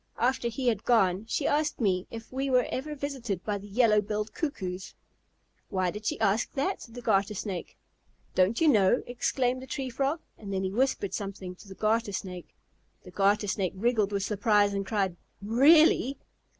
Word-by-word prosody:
After 245 0 +1
he 250 +2 -3
had 220 -3 +1
gone, 195 -4 +3
she 280 - -1
asked 300 +1 +1
me 190 -5 +1
if 225 +1 -9
we 270 +1 -1
were 250 -2 +4
ever 300 +4 -3
visited 260 -10 -4
by 205 -1 -1
the 200 - -11
Yellow 210 0 +4
Billed 210 +1 -3
Cuckoos." 190 - -4 0.7
"Why 185 -2 0
did 210 +2 -6
she - - -1
ask 210 +1 +1
that?" 285 +8 -1
said 230 - -12
the 245 - -8
Garter 205 -1 +2
Snake. 185 -3 -5 0.6
"Don't 185 +5 +2
you 325 - +4
know?" 210 -4 +4
exclaimed 250 +1 -1
the 260 - -9
Tree 265 -2 -4
Frog. 275 +6 0 0.2
And 200 -2 -7
then 190 -1 -1
he 190 - -1
whispered 215 -4 0
something 195 -2 -5
to 185 - -16
the 190 - -10
Garter 215 0 0
Snake. 180 -2 -6 0.5
The - - -12
Garter 205 +1 +2
Snake 190 -2 -1
wriggled 215 0 +1
with 200 -1 -1
surprise 205 0 +2
and 195 -1 -2
cried, 195 -5 0 0.2
"Really?" 275 +5 +5
215 Hz, 185 wpm, -28 LUFS, 195-255 Hz, 0.7 s, Really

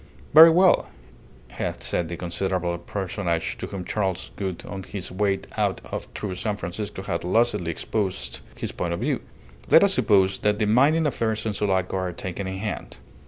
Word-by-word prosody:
"Very 160 +2 +11
well," 180 +3 +4 0.6
had - - -4
said 85 - -1
the 85 - -5
considerable 90 0 -1
personage 90 -2 -2
to - - -4
whom 95 -2 -6
Charles 95 -3 -2
Gould 95 -3 -4
on 95 -1 -6
his 95 0 -7
way 95 0 0 0.2
out - - +1 0.4
through 100 -3 -3
San 105 +3 -2
Francisco 95 +1 -5
had 85 -3 -3
lucidly 105 -1 +1
exposed 95 +3 -3 0.2
his - - -4
point 85 -1 -2
of - - -6
view. - - 0 0.5
"Let - - +8
us - - +5
suppose 95 -1 +3
that 105 0 +1
the 110 - +1
mining 140 +9 +4
affairs 110 -6 -1
of 105 -2 -1
Sulaco 95 -2 0
are 90 -1 -2
taken 95 +2 -5
in 95 0 -4
hand. 105 0 -5
95 Hz, 170 wpm, -25 LUFS, 90-105 Hz, 0.6 s, Very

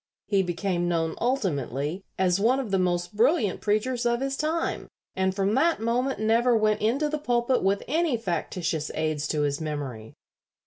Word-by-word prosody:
He 200 -2 +2
became 175 0 -1
known 165 -2 0
ultimately 165 - -1 0.2
as 185 0 +2
one 245 +6 +3
of 245 -7 -4
the 195 - +2
most 175 +1 -1
brilliant 230 - +2
preachers 235 +4 0
of 235 0 +1
his 270 +1 -2
time, 315 +3 -2 0.3
and 190 0 0
from 195 +1 +1
that 320 +7 +2
moment 240 +2 0
never 230 +2 +3
went 215 -1 +1
into 255 +8 +1
the 305 0 -2
pulpit 245 -2 +1
with 195 +1 +1
any 315 -2 +1
factitious 170 -5 -2
aids 155 -2 -1
to 150 0 -1
his 145 +1 -1
memory." 135 -8 -5
205 Hz, 170 wpm, -26 LUFS, 175-245 Hz, 0.3 s, one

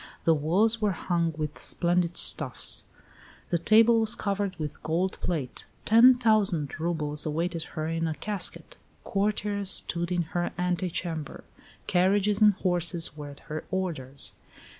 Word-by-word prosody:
"The 165 - +4
walls 195 +10 +1
were 210 -2 +1
hung 170 -1 -1
with 150 -1 -4
splendid 175 0 +1
stuffs; - - +2 0.7
the 170 - +2
table 225 +5 +5
was 220 +1 0
covered 200 -2 -2
with 155 -4 -6
gold 175 +4 -1
plate; 150 -8 -3 0.2
ten 240 +3 +7
thousand 200 - +1
roubles 150 -3 -2
awaited 165 +2 -2 0.2
her 155 - -1
in 165 0 -1
a 160 - -3
casket. 205 +6 -4 0.3
Courtiers 205 -1 -1
stood 170 -1 0
in 175 -1 +1
her 175 0 -1
ante 180 0 -1
chamber; 160 -3 -5 0.4
carriages 200 +3 +2
and 210 -2 +6
horses 175 -4 -1
were 145 -1 -8
at 140 - -12
her 155 +1 -6
orders." 155 -8 -4
175 Hz, 140 wpm, -27 LUFS, 160-200 Hz, 0.7 s, ten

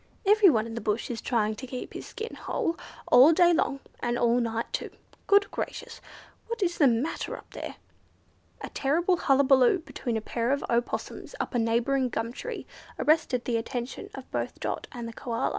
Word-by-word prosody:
Everyone 385 - +5
in 230 - -7
the 230 - -4
bush 215 +3 -1
is 230 - -4
trying 220 -4 +1
to 260 - -7
keep 250 0 -6
his - - -7
skin 450 +1 -6
whole, 345 -9 -2 0.4
all 275 +6 +8
day 345 +1 +5
long, 275 -4 0 0.2
and 240 0 -1
all 240 0 +3
night 230 -1 -1
too. - - -2 0.4
Good 405 0 +4
gracious! - - -5 0.5
What 465 -2 -2
is 345 -1 -1
the 290 - +7
matter 245 +6 -1
up - - -15
there?" - - -6 0.9
A - - -5
terrible 340 +6 +1
hullabaloo 270 0 +4
between 250 -8 -4
a - - 0
pair 230 +2 -2
of 280 +1 0
Opossums 240 - -2
up - - -3
a 245 - +2
neighbouring 240 +3 +1
gum 230 +1 -3
tree 480 - -6 0.3
arrested 280 -5 +2
the 235 -2 +1
attention 240 +2 -5
of - - -9
both - - -3
Dot - - -3
and 240 -2 -6
the 230 - -7
Koala. 230 0 -2
255 Hz, 185 wpm, -27 LUFS, 235-330 Hz, 0.9 s, all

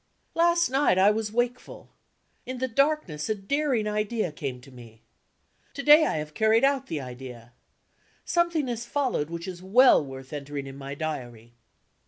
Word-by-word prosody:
Last 340 +1 +3
night, 270 -7 +3
I 195 +2 +5
was 215 0 -2
wakeful. 240 +2 -3 0.6
In 255 0 -5
the 260 +1 -1
darkness 260 - 0
a 215 - +1
daring 245 +2 -1
idea 210 -2 -1
came 135 -4 -5
to 135 - -16
me. 115 -3 -15 0.7
To 280 - -5
day, 300 +2 +7
I - - -1
have 150 0 -5
carried 220 - +3
out 275 -1 +2
the 160 - -3
idea. 125 -2 -10 0.7
Something 340 -5 +1
has 235 -1 -3
followed 245 - -1
which 170 +1 -6
is 180 -1 -7
well 225 - +5
worth 135 0 -10
entering 145 -1 -5
in 135 0 -9
my 140 0 -7
Diary. 120 -7 -6
205 Hz, 165 wpm, -26 LUFS, -, 0.7 s, day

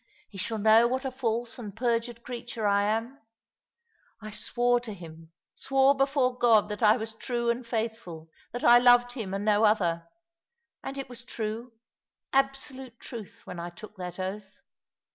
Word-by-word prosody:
He 195 - -9
shall 220 +4 -2
know 220 +2 +6
what 260 +2 -2
a 265 - -2
false 235 -2 -2
and 210 -4 -8
perjured 235 0 -1
creature 240 -2 -5
I 200 0 +3
am. 225 +6 -2 1.0
I 215 -1 -8
swore 245 +3 +1
to 230 -4 -8
him 165 -2 -12
— - - -65
swore 270 0 +3
before 270 -2 +1
God 225 -3 +4
that 210 +2 -5
I 215 +1 +6
was 220 -1 -4
true 235 +1 -1
and 235 0 -5
faithful 220 -9 -4
— - - -32
that 245 - -5
I 240 0 +8
loved 245 0 +5
him 225 -7 -5
and 200 +1 -3
no 210 0 +3
other. 175 -6 +2 0.8
And 275 - -6
it 275 - -5
was 245 -2 -6
true, 230 0 -5 0.6
absolute 270 -2 -1
truth, 225 -5 -9
when 175 - -7
I 170 +1 -5
took 210 +4 -12
that 180 -1 -6
oath. 195 +1 -6
230 Hz, 175 wpm, -28 LUFS, 210-245 Hz, 1.0 s, I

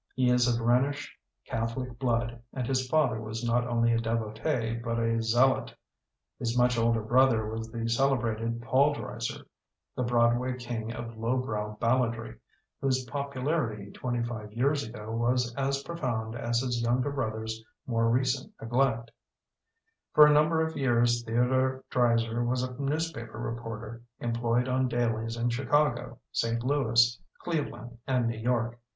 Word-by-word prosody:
He 125 -1 +3
is 125 0 +4
of 120 -1 +2
Rhenish 130 +5 +1 0.3
Catholic 115 +2 -3
blood 120 -2 0
and 130 -2 -2
his 130 0 0
father 125 -8 +2
was 110 +2 -5
not 120 +1 +1
only 115 -1 +2
a 115 - +2
devotee 115 +2 -1
but 115 0 -3
a 115 0 +1
zealot. 120 +4 +2 0.6
His 120 +1 -1
much 125 0 +4
older 115 -1 +2
brother 120 -1 +4
was 110 +1 -5
the 115 0 -3
celebrated 115 -2 0
Paul 140 +4 +3
Dresser, 115 -4 -5 0.5
the - - -2
Broadway 120 +1 +2
king 120 -2 -4
of 115 -1 -7
low 115 +3 +1
brow 105 -4 -3
balladry, 115 - 0 0.4
whose 130 -1 +1
popularity 130 -5 -2
twenty 120 -2 -2
five 110 -3 -5
years 140 +5 +1
ago 110 -1 -7
was 120 +1 +1
as 135 +1 -1
profound 120 -9 -3
as 120 0 0
his 125 -2 -1
younger 125 +4 +1
brother's 110 -4 -3 0.2
more 115 -2 +1
recent 130 - 0
neglect 115 -1 0 1.0
For 150 - +9
a 150 - +6
number 160 +2 +3
of 160 - -5
years 120 -3 +2
Theo 120 +2 +1
dore 130 0 +1
Dreiser 115 -1 +2
was 125 +1 0
a 130 0 -4
newspaper 140 -6 -2
report 115 -1 -5
er, 115 +1 -8 0.2
employed 120 +1 0
on 130 0 +1
dailies 115 -1 -1
in 120 +1 0
Chicago, 130 -1 +1
St. 115 0 0
Louis, 120 -4 +3 0.2
Cleveland, 120 -8 -4
and 125 -3 +2
New 115 -1 -2
York. 120 0 0
120 Hz, 150 wpm, -29 LUFS, 115-130 Hz, 1.0 s, For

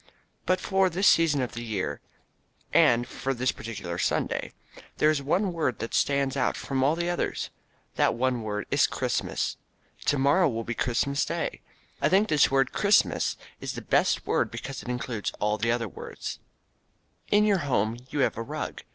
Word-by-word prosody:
But 185 - +3
for 190 -2 +2
this 185 +4 +2
season 155 -5 +4
of 120 - -4
the 120 - -6
year, 110 -5 -3 0.7
and 120 +1 +5
for 135 0 -3
this 130 +2 +1
particular 95 -6 -6
Sunday, - - -1 0.5
there 155 - +4
is 150 -2 -1
one 180 +7 0
word 145 -9 -1
that 115 - -5
stands 140 -1 +1
out 135 - 0
from 135 - -3
among 135 +2 +4
all 155 - +1
the 170 +1 -2
others. 175 - -2 0.5
That - - +3
one 125 0 0
word 105 -1 -3
is - - +4
"Christmas." - - -2 0.5
To 145 - +2
morrow 145 +6 +4
will 115 -2 -3
be 115 - -3
Christmas 130 +4 0
day. - - -3 0.4
I 140 - +3
think 200 +5 +3
this 150 -2 +4
word 135 -1 +2
"Christmas" 200 0 +2 0.2
is - - -4
the - - -6
best - - +2
word - - +1
because 135 - -6
it - - -9
includes 125 -3 -3
all 105 +1 0
the 115 +2 +1
other 120 -1 0
good 105 - -11
words. - - -6 0.9
In 210 +1 +4
your 200 -3 +3
home 120 -6 0
you 145 - -1
have 130 - +1
a - - -2
rug. 115 - -5
135 Hz, 185 wpm, -27 LUFS, 115-160 Hz, 0.9 s, and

